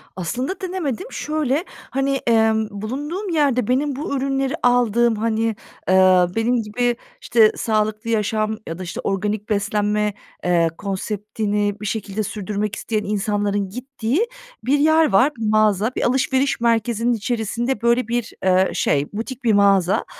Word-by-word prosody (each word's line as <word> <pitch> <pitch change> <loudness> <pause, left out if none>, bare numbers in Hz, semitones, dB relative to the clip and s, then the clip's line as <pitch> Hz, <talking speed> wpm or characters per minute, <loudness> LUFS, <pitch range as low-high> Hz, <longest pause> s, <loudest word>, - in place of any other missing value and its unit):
Aslında 250 - -3
denemedim. 370 - -3
Şöyle, 305 +1 -1 0.2
hani, 270 +1 0
emm, 220 -1 +3
bulunduğum 290 - -4
yerde 275 -8 +2
benim 275 +2 +1
bu 280 +1 -3
ürünleri 270 0 -1
aldığım, 240 -1 +3
hani, 220 +1 -1 0.5
eee, 185 -1 +6
benim 235 +1 +1
gibi 240 +3 0 0.3
işte 220 -2 +4
sağlıklı 215 0 -1
yaşam 215 0 0
ya 165 - -5
da - - -4
işte 175 - -6
organik 210 +2 -2
beslenme, 210 0 0 0.3
eee, 170 -2 +3
konseptini 205 +1 -2
bir - - -5
şekilde 210 0 -3
sürdürmek 210 +1 -3
isteyen 215 -2 -2
insanların 205 -1 -1
gittiği 260 - -2 0.4
bir 285 +3 +2
yer 315 -3 +4
var, 250 +10 +4
bir 225 - -3
mağaza. 215 +1 +3
Bir - - -1
alışveriş 265 +2 +1
merkezinin 235 0 +1
içerisinde, 235 +1 -2
böyle, 235 0 +2
bir, 235 -1 -2
eee, 185 0 +3
şey, 145 0 +1
butik 240 +4 -5
bir 225 - +3
mağaza. 195 -2 +3
220 Hz, 140 wpm, -21 LUFS, 205-255 Hz, 0.5 s, eee